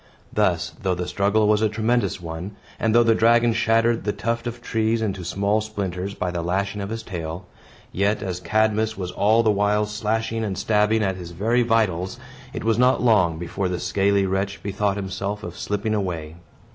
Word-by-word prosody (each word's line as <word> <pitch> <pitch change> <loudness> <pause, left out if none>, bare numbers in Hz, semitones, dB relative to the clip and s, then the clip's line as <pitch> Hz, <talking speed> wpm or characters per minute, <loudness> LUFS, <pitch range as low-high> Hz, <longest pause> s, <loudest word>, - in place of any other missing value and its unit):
Thus, 90 -5 +1
though 95 -2 0
the 90 0 -4
struggle 100 +4 +2
was 105 0 +3
a 110 - +3
tremendous 115 0 0
one, 85 +4 -6 0.2
and 115 0 +1
though 120 - +7
the 115 -1 +4
dragon 115 +1 +4
shattered 115 +1 +2
the 105 - 0
tuft 115 +3 -2
of 120 0 -5
trees 115 -1 0
into 100 -4 -2
small 100 +4 0
splinters 100 -2 -4
by 90 - -2
the 85 -1 -2
lashing 100 +4 -1
of 100 - -4
his 115 0 -5
tail, 85 -3 -6 0.5
yet, 100 +2 0
as 90 -3 -3
Cadmus 110 +2 +1
was 90 -2 -4
all 110 +5 +3
the 110 - +4
while 105 +1 +2
slashing 110 +1 -2
and 100 -4 -3
stabbing 105 +1 +2
at 95 -2 -1
his 90 -2 -8
very 110 +8 +1
vitals, 110 -3 0 0.3
it 140 - -5
was 115 0 +1
not 125 0 +3
long 95 -9 +3
before 90 +3 -3
the 90 -1 -2
scaly 100 +1 +2
wretch 95 +1 -2
bethought 100 0 -1
himself 100 +1 -4
of 85 - -6
slipping 105 +1 -2
away. 85 -7 -3
105 Hz, 190 wpm, -23 LUFS, 95-110 Hz, 0.5 s, though